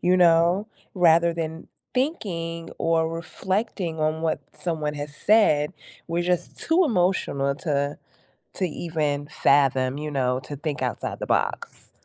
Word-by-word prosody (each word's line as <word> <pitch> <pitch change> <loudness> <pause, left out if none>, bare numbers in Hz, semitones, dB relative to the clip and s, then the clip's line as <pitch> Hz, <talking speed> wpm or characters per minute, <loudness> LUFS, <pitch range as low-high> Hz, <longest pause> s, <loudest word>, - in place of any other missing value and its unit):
you 180 +1 +3
know? 175 +4 +4 0.3
Rather 170 -2 +5
than 160 -1 -4 0.3
thinking 170 - -2
or 165 -1 +2
reflecting 180 +1 -3
on 155 +1 0
what 160 -2 0 0.2
someone 155 -4 -2
has 145 0 -6
said, 155 -7 +3 0.4
we're 170 +1 0
just 175 -1 -1
too 340 +3 +3
emotional 180 - +1
to 145 -3 -1 0.6
to 185 - -1
even 150 -3 -2
fathom, 135 -3 +2
you 150 0 -4
know, 130 -2 +1
to 145 - -7
think 145 -1 -3
outside 125 -4 -3
the - - -4
box. - - -1
165 Hz, 135 wpm, -25 LUFS, 145-180 Hz, 0.6 s, Rather